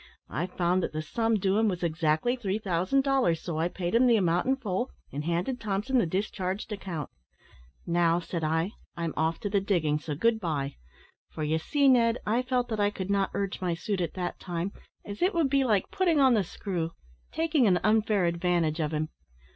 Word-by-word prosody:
I 170 Hz, +4 st, -1 dB
found 180 Hz, 0 st, +1 dB
that -, -, -3 dB
the 155 Hz, 0 st, -3 dB
sum 225 Hz, +7 st, 0 dB
due 195 Hz, 0 st, +2 dB
him 220 Hz, -, +3 dB
was 180 Hz, -3 st, -2 dB
exactly 160 Hz, +7 st, +1 dB
three 205 Hz, -5 st, -2 dB
thousand 195 Hz, +6 st, +1 dB
dollars, 265 Hz, -, +2 dB
so 160 Hz, -1 st, -4 dB
I 165 Hz, -, +2 dB
paid 175 Hz, -1 st, -4 dB
him 245 Hz, +2 st, +5 dB
the 235 Hz, -, +5 dB
amount 180 Hz, -1 st, +2 dB
in 265 Hz, -, +3 dB
full, 240 Hz, -2 st, -2 dB, 0.2 s
and 145 Hz, +2 st, -3 dB
handed 175 Hz, +10 st, -1 dB
Thompson 215 Hz, +5 st, 0 dB
the 215 Hz, -, +2 dB
discharged 190 Hz, +2 st, -3 dB
account. 180 Hz, -8 st, -5 dB, 0.8 s
`Now,' 170 Hz, 0 st, +2 dB
said 170 Hz, -3 st, -3 dB
I, 160 Hz, +5 st, 0 dB, 0.3 s
`I'm 170 Hz, -2 st, -2 dB
off 160 Hz, +2 st, 0 dB
to 205 Hz, -, -2 dB
the 200 Hz, -1 st, +2 dB
diggings, 155 Hz, -7 st, 0 dB
so 150 Hz, -, -2 dB
good 225 Hz, +8 st, +2 dB
bye!' 145 Hz, -7 st, -2 dB, 0.5 s
for, 155 Hz, -, -5 dB
you 155 Hz, +2 st, +1 dB
see, 280 Hz, -, +2 dB
Ned, 235 Hz, -3 st, +4 dB
I 225 Hz, +4 st, +2 dB
felt 250 Hz, -1 st, 0 dB
that 220 Hz, -2 st, -2 dB
I 205 Hz, 0 st, +3 dB
could 195 Hz, -1 st, -4 dB
not 200 Hz, -1 st, +2 dB
urge 195 Hz, -1 st, -2 dB
my 175 Hz, -2 st, 0 dB
suit 195 Hz, +2 st, -2 dB
at 170 Hz, -, -3 dB
that 180 Hz, -1 st, -3 dB
time, 175 Hz, +2 st, -3 dB, 0.3 s
as 205 Hz, 0 st, -7 dB
it 365 Hz, +1 st, +2 dB
would 315 Hz, -5 st, +2 dB
be 275 Hz, -1 st, +4 dB
like 210 Hz, -7 st, +1 dB
putting 360 Hz, -6 st, +2 dB
on 265 Hz, -2 st, +6 dB
the 215 Hz, -4 st, +3 dB
screw 170 Hz, -2 st, -4 dB, 0.4 s
taking 320 Hz, -6 st, +2 dB
an 180 Hz, -2 st, +4 dB
unfair 215 Hz, -2 st, +3 dB
advantage 170 Hz, -2 st, +1 dB
of 155 Hz, -1 st, -1 dB
him. 155 Hz, +1 st, -1 dB
190 Hz, 210 wpm, -28 LUFS, 170-230 Hz, 0.8 s, on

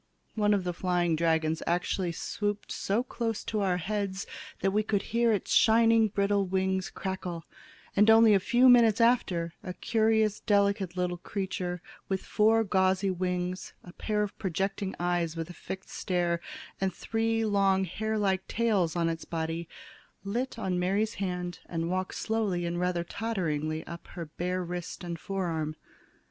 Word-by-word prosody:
One 210 Hz, -1 st, +3 dB
of 195 Hz, -, -1 dB
the 180 Hz, -1 st, -2 dB
flying 175 Hz, -2 st, +1 dB
dragons 160 Hz, -1 st, +1 dB
actually 175 Hz, +1 st, 0 dB
swooped 205 Hz, +4 st, -3 dB
so 210 Hz, +5 st, 0 dB
close 230 Hz, -3 st, -3 dB
to 215 Hz, -, -2 dB
our 185 Hz, -2 st, +1 dB
heads 195 Hz, +1 st, -2 dB, 0.4 s
that 195 Hz, -, +2 dB
we 210 Hz, +2 st, +2 dB
could 210 Hz, -2 st, 0 dB
hear 235 Hz, 0 st, +4 dB
its 205 Hz, -, 0 dB
shining 225 Hz, 0 st, +5 dB
brittle 200 Hz, -1 st, +1 dB
wings 190 Hz, 0 st, 0 dB
crackle, 185 Hz, -4 st, -5 dB, 0.5 s
and 210 Hz, +2 st, +5 dB
only 225 Hz, -1 st, +7 dB
a 200 Hz, -, +5 dB
few 240 Hz, +6 st, +4 dB
minutes 235 Hz, -3 st, +6 dB
after, 185 Hz, -8 st, +2 dB
a 180 Hz, -1 st, -6 dB
curious 220 Hz, -2 st, +2 dB
delicate 200 Hz, -3 st, +1 dB
little 180 Hz, -1 st, -1 dB
creature 180 Hz, -2 st, -4 dB, 0.3 s
with 190 Hz, -1 st, -2 dB
four 225 Hz, +1 st, +3 dB
gauzy 190 Hz, -1 st, +2 dB
wings, 180 Hz, 0 st, -2 dB
a 175 Hz, -, -12 dB
pair 210 Hz, 0 st, -1 dB
of 205 Hz, -, -5 dB
projecting 195 Hz, +1 st, -2 dB
eyes 175 Hz, -2 st, 0 dB
with 165 Hz, +1 st, -4 dB
a -, -, -10 dB
fixed 190 Hz, +2 st, -8 dB
stare, 175 Hz, -2 st, -1 dB, 0.4 s
and 190 Hz, -1 st, +1 dB
three 225 Hz, +1 st, -1 dB
long 195 Hz, -2 st, +3 dB
hair 220 Hz, +4 st, -2 dB
like 190 Hz, -2 st, 0 dB
tails 205 Hz, -8 st, +1 dB
on 170 Hz, -1 st, +1 dB
its 165 Hz, 0 st, -2 dB
body, 165 Hz, 0 st, -3 dB, 0.5 s
lit 235 Hz, +6 st, -2 dB
on 185 Hz, -5 st, -1 dB
Mary's 200 Hz, +4 st, +1 dB
hand 180 Hz, -2 st, -3 dB
and 165 Hz, 0 st, -2 dB
walked 185 Hz, 0 st, -2 dB
slowly 210 Hz, -6 st, -1 dB
and 170 Hz, 0 st, -2 dB
rather 180 Hz, -1 st, 0 dB
totteringly 160 Hz, -7 st, -2 dB
up 170 Hz, 0 st, -9 dB
her 170 Hz, -, -7 dB
bare 180 Hz, +4 st, -3 dB
wrist 175 Hz, +1 st, -6 dB
and 170 Hz, -2 st, -5 dB
fore 195 Hz, +1 st, -3 dB
arm. 155 Hz, -2 st, -2 dB
190 Hz, 160 wpm, -29 LUFS, 175-210 Hz, 0.5 s, only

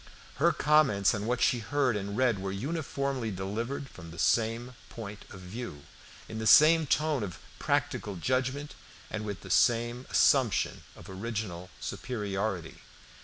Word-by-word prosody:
Her -, -, +4 dB
comments 135 Hz, -10 st, +3 dB
on 105 Hz, -1 st, -3 dB
what 125 Hz, +1 st, 0 dB
she 125 Hz, -, +3 dB
heard 130 Hz, +1 st, +1 dB
and 100 Hz, +1 st, -3 dB
read 125 Hz, -5 st, +2 dB
were 95 Hz, 0 st, -3 dB
uniformly 140 Hz, -, -2 dB
delivered 110 Hz, +8 st, -4 dB
from 85 Hz, -9 st, -12 dB
the 85 Hz, -, -11 dB
same 115 Hz, +5 st, +1 dB, 0.2 s
point 105 Hz, -2 st, -8 dB
of 95 Hz, -, -11 dB
view, 90 Hz, -6 st, -7 dB, 0.4 s
in 110 Hz, -, -6 dB
the 110 Hz, -, -1 dB
same 155 Hz, +5 st, +7 dB
tone 150 Hz, -1 st, +1 dB
of 90 Hz, -6 st, -5 dB, 0.2 s
practical 100 Hz, -, -1 dB
judgment, 130 Hz, -, -1 dB, 0.4 s
and 110 Hz, 0 st, -3 dB
with 100 Hz, -2 st, -5 dB
the 95 Hz, -, -8 dB
same 120 Hz, +3 st, +2 dB
assumption 130 Hz, -6 st, +3 dB
of -, -, -13 dB
original 95 Hz, -3 st, -5 dB
superiority. 100 Hz, -7 st, -3 dB
115 Hz, 145 wpm, -29 LUFS, 100-130 Hz, 0.4 s, same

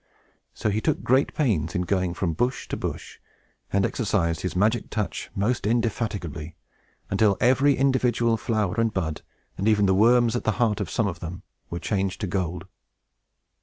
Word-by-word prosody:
So 110 Hz, -, -1 dB
he 110 Hz, +2 st, 0 dB
took -, -, 0 dB
great 130 Hz, +3 st, +3 dB
pains 95 Hz, -, 0 dB
in 90 Hz, -, +1 dB
going 90 Hz, -1 st, 0 dB
from 85 Hz, -2 st, -1 dB
bush 125 Hz, -, -1 dB
to -, -, -2 dB
bush, -, -, -6 dB, 0.5 s
and 100 Hz, 0 st, +2 dB
exercised 85 Hz, -8 st, 0 dB
his 90 Hz, -, -3 dB
magic 110 Hz, +6 st, +1 dB
touch 100 Hz, -9 st, -3 dB
most 105 Hz, +1 st, 0 dB
indefatigably; 105 Hz, -9 st, -2 dB, 0.6 s
until 100 Hz, 0 st, +3 dB
every 130 Hz, +3 st, +4 dB
individual 125 Hz, -3 st, +2 dB
flower 110 Hz, -3 st, -1 dB
and 115 Hz, -1 st, +2 dB
bud, 80 Hz, -6 st, -3 dB, 0.4 s
and 100 Hz, -, 0 dB
even 105 Hz, -2 st, +4 dB
the 95 Hz, -, +3 dB
worms 120 Hz, +4 st, +4 dB
at 120 Hz, -, -2 dB
the 110 Hz, -, +1 dB
heart 110 Hz, -4 st, +1 dB
of -, -, -3 dB
some 115 Hz, -, 0 dB
of 90 Hz, -4 st, -3 dB
them, 90 Hz, +3 st, -7 dB, 0.3 s
were 85 Hz, -, -4 dB
changed 95 Hz, 0 st, -1 dB
to -, -, 0 dB
gold. 90 Hz, -1 st, -2 dB
105 Hz, 170 wpm, -25 LUFS, 90-115 Hz, 0.6 s, every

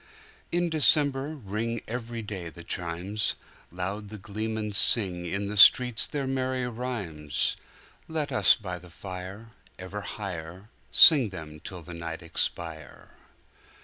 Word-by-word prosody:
In 175 Hz, 0 st, 0 dB
December 145 Hz, -1 st, +2 dB
ring 115 Hz, -1 st, -4 dB
Every 115 Hz, 0 st, -5 dB
day 95 Hz, -5 st, -6 dB
the 85 Hz, +1 st, -12 dB
chimes; 90 Hz, +5 st, -3 dB, 0.4 s
Loud 95 Hz, +4 st, -5 dB
the 110 Hz, -, -8 dB
gleemen 110 Hz, +2 st, -4 dB
singIn 100 Hz, -2 st, +3 dB
the -, -, -4 dB
streets 125 Hz, +3 st, +6 dB
their 140 Hz, -2 st, -3 dB
merry 130 Hz, -1 st, -1 dB
rhymes. 100 Hz, -, -1 dB, 0.5 s
Let 155 Hz, -3 st, -3 dB
us 130 Hz, -, +5 dB
by 90 Hz, -6 st, -6 dB
the 90 Hz, +1 st, -15 dB
fire 95 Hz, +4 st, -8 dB, 0.3 s
Ever 95 Hz, +3 st, -6 dB
higherSing 100 Hz, -, +3 dB
them 80 Hz, -5 st, -9 dB
till 90 Hz, +2 st, -9 dB
the 90 Hz, -, -10 dB
night 85 Hz, +1 st, -6 dB
expire! 80 Hz, -1 st, -3 dB
100 Hz, 120 wpm, -27 LUFS, 90-120 Hz, 0.5 s, streets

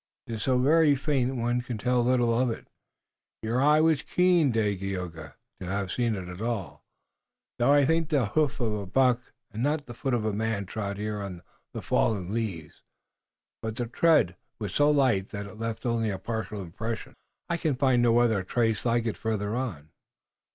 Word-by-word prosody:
"It 115 Hz, -, -6 dB
is 110 Hz, -, -4 dB
so 130 Hz, +3 st, +2 dB
very 150 Hz, +3 st, +4 dB
faint 135 Hz, -2 st, 0 dB
one 120 Hz, 0 st, 0 dB
can 120 Hz, -2 st, -5 dB
tell 125 Hz, +3 st, +1 dB
little 120 Hz, -1 st, +2 dB
of 125 Hz, +2 st, +2 dB
it. 115 Hz, -, -6 dB, 0.8 s
Your 115 Hz, +3 st, 0 dB
eye 150 Hz, +2 st, +5 dB
was 160 Hz, -2 st, +3 dB
keen, 175 Hz, -3 st, +3 dB
Dagaeoga, 95 Hz, -7 st, -3 dB, 0.2 s
to -, -, -6 dB
have 100 Hz, 0 st, -2 dB
seen 120 Hz, -3 st, 0 dB
it 95 Hz, -2 st, -6 dB
at 90 Hz, +2 st, -8 dB
all, 115 Hz, -5 st, -3 dB, 0.8 s
though 120 Hz, +4 st, +4 dB
I 145 Hz, -1 st, +5 dB
think 160 Hz, +1 st, +1 dB
the 140 Hz, -6 st, +2 dB
hoof 145 Hz, +7 st, 0 dB
of 115 Hz, -4 st, 0 dB
a 100 Hz, -2 st, -4 dB
buck 125 Hz, +3 st, +2 dB, 0.2 s
and 110 Hz, -, -5 dB
not 145 Hz, +2 st, 0 dB
the 120 Hz, -, -8 dB
foot 130 Hz, +2 st, -1 dB
of 110 Hz, -3 st, -1 dB
a 110 Hz, -, 0 dB
man 110 Hz, -1 st, -1 dB
trod 100 Hz, 0 st, -4 dB
here 105 Hz, 0 st, -3 dB
on 95 Hz, -3 st, -7 dB, 0.3 s
the -, -, -6 dB
fallen 100 Hz, -3 st, 0 dB
leaves, 95 Hz, -10 st, -4 dB, 0.8 s
but 110 Hz, -1 st, -4 dB
the 120 Hz, -, -2 dB
tread 135 Hz, -, +3 dB, 0.2 s
was 105 Hz, -4 st, -5 dB
so 145 Hz, 0 st, +4 dB
light 130 Hz, -10 st, +2 dB
that 100 Hz, -1 st, -5 dB
it 105 Hz, +2 st, -11 dB
left 115 Hz, +1 st, -4 dB
only 115 Hz, -2 st, +1 dB
a 100 Hz, -, -2 dB
partial 110 Hz, 0 st, -4 dB
impression." 110 Hz, +7 st, -5 dB, 0.3 s
"I 170 Hz, -, 0 dB
can 155 Hz, -5 st, 0 dB
find 130 Hz, -2 st, +3 dB
no 120 Hz, -1 st, +4 dB
other 115 Hz, -4 st, +3 dB
trace 115 Hz, +1 st, 0 dB
like 120 Hz, -1 st, +2 dB
it 115 Hz, -, -2 dB
farther 110 Hz, -1 st, -2 dB
on." 90 Hz, -, -4 dB
115 Hz, 195 wpm, -27 LUFS, 100-130 Hz, 0.8 s, eye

